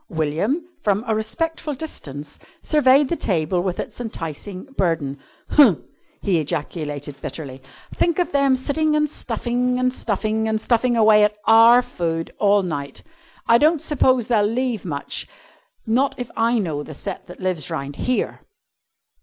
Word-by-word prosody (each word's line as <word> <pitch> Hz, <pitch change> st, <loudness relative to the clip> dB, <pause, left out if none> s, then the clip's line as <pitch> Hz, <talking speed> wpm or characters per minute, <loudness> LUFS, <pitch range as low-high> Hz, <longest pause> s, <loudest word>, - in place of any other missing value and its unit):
William, 170 Hz, -, -1 dB
from 205 Hz, +1 st, +1 dB
a 225 Hz, -, 0 dB
respectful 295 Hz, +8 st, -2 dB
distance, 145 Hz, -, -7 dB, 0.2 s
surveyed 280 Hz, -2 st, +4 dB
the 340 Hz, -, -1 dB
table 175 Hz, -, 0 dB
with 180 Hz, -1 st, -3 dB
its -, -, -5 dB
enticing 185 Hz, -3 st, -6 dB
burden. 155 Hz, -, -1 dB, 0.3 s
"Huh!" 270 Hz, -, +7 dB, 0.5 s
he 185 Hz, -4 st, +2 dB
ejaculated 145 Hz, -2 st, -4 dB
bitterly, 135 Hz, -4 st, -7 dB, 0.3 s
"think 340 Hz, -2 st, +1 dB
of 355 Hz, -, 0 dB
them 275 Hz, -2 st, +3 dB
sitting 300 Hz, +4 st, 0 dB
and 300 Hz, 0 st, +2 dB
stuffing, 250 Hz, -2 st, -1 dB
and 255 Hz, 0 st, +1 dB
stuffing, 220 Hz, -1 st, -1 dB
and 220 Hz, 0 st, 0 dB
stuffing 240 Hz, +1 st, +1 dB
away 215 Hz, -1 st, +6 dB
at 210 Hz, 0 st, +1 dB
our 230 Hz, +2 st, +7 dB
food 165 Hz, -6 st, -3 dB
all 205 Hz, -1 st, +4 dB
night! 140 Hz, -6 st, -5 dB, 0.4 s
I 230 Hz, 0 st, +6 dB
don't 310 Hz, +3 st, +4 dB
suppose 260 Hz, -5 st, +2 dB
they'll 230 Hz, -3 st, +2 dB
leave 230 Hz, 0 st, -1 dB
much 145 Hz, -5 st, -3 dB, 0.6 s
not 255 Hz, +5 st, +1 dB
if 245 Hz, -1 st, -6 dB
I 230 Hz, +1 st, +2 dB
know 160 Hz, -9 st, -2 dB
the 150 Hz, 0 st, -9 dB
set 195 Hz, +6 st, -6 dB
that 180 Hz, -, -11 dB
lives 185 Hz, -6 st, -2 dB
round 140 Hz, +1 st, -5 dB
here!" 250 Hz, 0 st, -1 dB
220 Hz, 150 wpm, -21 LUFS, 165-255 Hz, 0.6 s, Huh